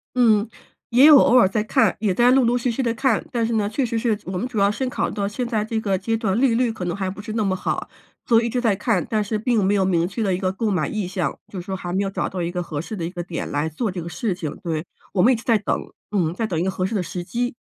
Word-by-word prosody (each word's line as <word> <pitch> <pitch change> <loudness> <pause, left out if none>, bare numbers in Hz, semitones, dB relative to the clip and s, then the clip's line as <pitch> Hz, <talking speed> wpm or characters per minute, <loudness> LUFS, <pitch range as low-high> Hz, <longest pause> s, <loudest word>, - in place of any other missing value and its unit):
嗯， 220 -3 +4 0.4
也 250 +4 +6
有 300 -1 +10
偶 255 - +5
尔 240 - +6
在 210 +2 -1
看， 215 - +2
也 210 -4 +1
在 240 +6 +4
陆 265 0 +5
陆 240 +1 +2
续 245 0 0
续 235 - -2
地 235 -3 0
看。 265 +3 +1
但 235 -3 0
是 230 - -1
呢， 210 -2 +1
确 255 +5 0
实 230 -1 -1
是 225 -2 +1
我 185 0 -4
们 240 - -2
主 250 -3 -7
要 200 0 +4
是 260 +5 -2
考 - - -1
虑 - - -6
到 200 -2 -1
现 240 +4 -3
在 220 -3 0
这 220 +1 -2
个 200 -3 0
阶 225 +5 -1
段 220 -2 0
利 255 -3 +3
率 240 -1 +2
可 190 -5 -6
能 175 - -2
还 190 -1 -2
不 200 +2 -7
是 215 +1 -6
那 220 -1 0
么 190 -2 +1
好， - - -3 0.4
所 230 -1 +4
以 235 - -1
一 - - -2
直 250 - -1
在 225 -5 +2
看， 210 -2 0
但 215 -1 +1
是 215 +1 -2
并 220 0 +1
没 195 +2 +2
有 195 -1 +2
明 170 -2 +2
确 210 +4 -3
的 195 -3 +1
一 - - 0
个 185 -1 0
购 210 +2 -1
买 165 -6 0
意 210 -4 -3
向， 185 -1 -2
就 190 - -7
是 - - -14
说 190 - -3
还 175 -1 -5
没 190 - +1
有 195 - -1
找 195 - -2
到 185 - -4
一 170 0 -2
个 180 0 -3
合 150 -4 -4
适 215 - -6
的 170 - -3
一 - - -3
个 175 -1 -5
点 170 -1 -5
来 145 +2 -1
做 200 +7 -2
这 180 -1 -5
个 170 - -6
事 220 +1 -2
情。 165 -4 -5
对， 160 -3 -2 0.3
我 185 - +2
们 240 - +6
一 - - +2
直 225 - -8
在 230 -2 +4
等。 205 - -1 0.3
嗯， 175 -6 +1
在 220 +5 -2
等 170 -6 -2
一 - - 0
个 190 - 0
合 185 - -3
适 225 - -4
的 190 - 0
时 175 0 -5
机。 245 +6 -2
210 Hz, 355 characters per minute, -22 LUFS, 185-230 Hz, 0.4 s, 有